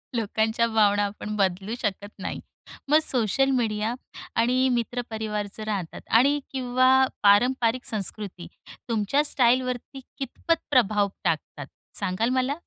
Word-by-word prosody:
लोकांच्या 220 Hz, +1 st, +1 dB
भावना 205 Hz, -2 st, +3 dB
आपण 210 Hz, +1 st, -5 dB
बदलू 195 Hz, +2 st, -1 dB
शकत 205 Hz, -1 st, -3 dB
नाही. -, -, -4 dB, 0.5 s
मग 305 Hz, +2 st, +6 dB
सोशल 260 Hz, +2 st, +1 dB
मीडिया 225 Hz, -3 st, 0 dB, 0.4 s
आणि 250 Hz, +3 st, +2 dB
मित्रपरिवार 220 Hz, -3 st, -2 dB
जर 215 Hz, -, -6 dB
राहतात 195 Hz, -6 st, -4 dB, 0.2 s
आणि 280 Hz, +4 st, +3 dB
किंवा 260 Hz, 0 st, +3 dB, 0.2 s
पारंपारिक 240 Hz, +4 st, +3 dB
संस्कृती 200 Hz, -3 st, -4 dB, 0.4 s
तुमच्या 230 Hz, +6 st, +1 dB
स्टाईलवरती 255 Hz, 0 st, +1 dB, 0.2 s
कितपत 315 Hz, +5 st, -2 dB
प्रभाव 215 Hz, -5 st, +3 dB, 0.2 s
टाकतात, 150 Hz, -4 st, -2 dB, 0.3 s
सांगाल 185 Hz, +6 st, 0 dB
मला? 255 Hz, +2 st, +1 dB
230 Hz, 115 wpm, -25 LUFS, 205-255 Hz, 0.5 s, मग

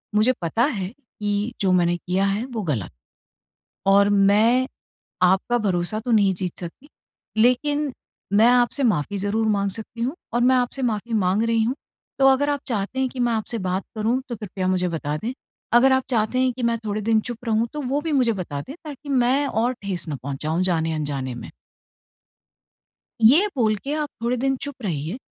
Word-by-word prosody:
मुझे 215 Hz, +4 st, +5 dB
पता 175 Hz, +8 st, +1 dB
है 210 Hz, -9 st, -1 dB
कि, 210 Hz, -3 st, -4 dB
जो 190 Hz, -2 st, +2 dB
मैंने 175 Hz, -1 st, +3 dB
किया 185 Hz, +3 st, 0 dB
है 200 Hz, +4 st, 0 dB
वो 225 Hz, -, -2 dB
गलत 135 Hz, -, -2 dB, 1.0 s
और 200 Hz, +1 st, +5 dB
मैं 210 Hz, +6 st, +4 dB, 0.6 s
आपका 190 Hz, +6 st, +3 dB
भरोसा 195 Hz, -1 st, -1 dB
तो 235 Hz, +2 st, -3 dB
नहीं 200 Hz, -4 st, +4 dB
जीत 180 Hz, -1 st, -4 dB
सकती 180 Hz, -, -9 dB, 0.5 s
लेकिन 285 Hz, +5 st, +2 dB, 0.4 s
मैं 215 Hz, +3 st, +6 dB
आपसे 245 Hz, +3 st, +2 dB
माफ़ी 205 Hz, -, +1 dB
ज़रूर 205 Hz, +3 st, 0 dB
माँग 200 Hz, -2 st, +1 dB
सकती 225 Hz, +3 st, -7 dB
हूँ 260 Hz, +6 st, -1 dB, 0.2 s
और 240 Hz, -, +2 dB
मैं 255 Hz, +2 st, +5 dB
आपसे 250 Hz, +2 st, -1 dB
माफ़ी 230 Hz, -1 st, -2 dB
माँग 200 Hz, 0 st, +2 dB
रही 230 Hz, -1 st, +2 dB
हूँ। 240 Hz, +4 st, 0 dB, 0.4 s
तो 270 Hz, -, +6 dB
अगर 270 Hz, +2 st, +4 dB
आप 285 Hz, -1 st, 0 dB
चाहते 225 Hz, +2 st, -2 dB
हैं 260 Hz, -1 st, +1 dB
कि 255 Hz, -, -9 dB
मैं 240 Hz, -1 st, +2 dB
आपसे 225 Hz, +1 st, -2 dB
बात 185 Hz, 0 st, -2 dB
करूँ 225 Hz, +4 st, 0 dB
तो 240 Hz, -, -3 dB
कृपया 195 Hz, -3 st, -4 dB
मुझे 185 Hz, -1 st, +1 dB
बता 150 Hz, -3 st, -3 dB
दें। 230 Hz, +9 st, -4 dB, 0.4 s
अगर 250 Hz, +3 st, +6 dB
आप 260 Hz, 0 st, +2 dB
चाहते 235 Hz, 0 st, +1 dB
हैं 260 Hz, 0 st, +3 dB
कि 250 Hz, 0 st, -6 dB
मैं 235 Hz, 0 st, +2 dB
थोड़े 210 Hz, 0 st, -2 dB
दिन 220 Hz, +1 st, +3 dB
चुप 240 Hz, +1 st, -7 dB
रहूँ 225 Hz, 0 st, +1 dB
तो 300 Hz, -, -3 dB
वो 275 Hz, +2 st, -1 dB
भी 320 Hz, -, -3 dB
मुझे 255 Hz, -5 st, +3 dB
बता 165 Hz, -8 st, -4 dB
दें, 275 Hz, -, -9 dB
ताकि 290 Hz, -2 st, -9 dB
मैं 265 Hz, +1 st, +2 dB
और 240 Hz, 0 st, 0 dB
ठेस 185 Hz, -4 st, -4 dB
ना 150 Hz, -, -2 dB
पहुँचाऊँ 150 Hz, +5 st, -2 dB
जाने-अनजाने 155 Hz, -7 st, -1 dB
में। -, -, -9 dB, 1.7 s
ये 290 Hz, -, +6 dB
बोल 220 Hz, -5 st, +2 dB
के 280 Hz, -, -2 dB
आप 300 Hz, -1 st, -2 dB
थोड़े 245 Hz, +2 st, +1 dB
दिन 270 Hz, +2 st, +1 dB
चुप 285 Hz, -1 st, -5 dB
रहिए। 165 Hz, -, -3 dB
220 Hz, 190 wpm, -23 LUFS, 190-250 Hz, 1.7 s, मैं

